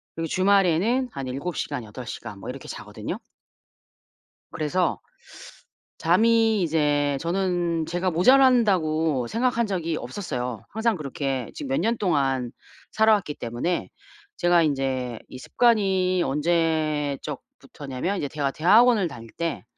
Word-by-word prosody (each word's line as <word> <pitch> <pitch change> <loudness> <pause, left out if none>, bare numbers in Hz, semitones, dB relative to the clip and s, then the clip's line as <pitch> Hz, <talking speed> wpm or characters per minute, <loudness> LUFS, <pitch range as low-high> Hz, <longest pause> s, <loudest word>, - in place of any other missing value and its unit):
그리고 165 0 -3
주말에는 195 - +2
한 135 -7 -6
7 140 +7 -4
시간, 145 -5 -3
8 110 +4 -9
시간 105 -5 -7
뭐 - - -8
이렇게 - - -8
자거든요. - - -6 1.3
그래서 175 +4 -1 1.0
잠이 220 +4 +3
이제 145 -3 +1
저는 175 -2 -1
제가 175 +3 -1
모자란다고 175 - +3
생각한 235 0 0
적이 170 -5 -2
없었어요. 125 - -5
항상 220 0 0
그렇게 135 -4 -3
지금 290 - -6
몇 270 - 0
년 230 +1 +1
동안 135 - 0 0.4
살아 220 0 +4
왔기 185 -8 -2
때문에 120 +10 -3 0.5
제가 175 -1 +3
인제 135 -5 -1
이 130 - -10
습관이 190 - +2
언제적부터냐면 150 -1 -2
이제 145 - -2
제가 140 -1 -2
대학원을 210 - +4
다닐 115 -6 -10
때 170 +5 -4
165 Hz, 270 characters per minute, -24 LUFS, 140-195 Hz, 1.3 s, 살아